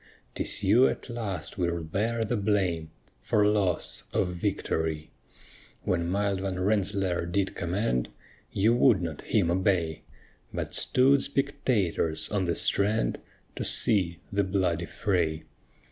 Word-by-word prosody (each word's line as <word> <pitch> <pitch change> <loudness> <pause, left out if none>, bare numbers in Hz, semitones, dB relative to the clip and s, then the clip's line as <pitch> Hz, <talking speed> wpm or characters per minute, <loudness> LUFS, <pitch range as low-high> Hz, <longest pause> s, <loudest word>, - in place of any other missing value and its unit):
'Tis - - -1
you 110 +7 +5
at - - -4
last 100 -8 -5
will 85 -1 -1
bear 110 +8 -1
the 110 +2 -1
blame 95 -6 0 0.3
For 105 - +2
loss 100 -5 +1
of 90 - 0
victory. 80 -4 -2 0.7
When 85 -2 0
mild 100 0 0
Van 95 -1 -3
Rensselaer 95 -3 0
did 95 +2 -1
command, 90 - -1 0.4
You 110 +4 +3
would 120 -4 +4
not 80 -3 -5
him 90 -6 +1
obey; 90 -3 0 0.5
But - - -4
stood 135 +2 +3
spectators 110 - 0
on 100 -3 0
the 85 -1 0
strand, 100 - +1 0.4
To - - -3
see 90 -7 +3 0.2
the 100 0 +2
bloody 90 -3 0
fray. 85 -6 -1
95 Hz, 130 wpm, -27 LUFS, 85-105 Hz, 0.7 s, you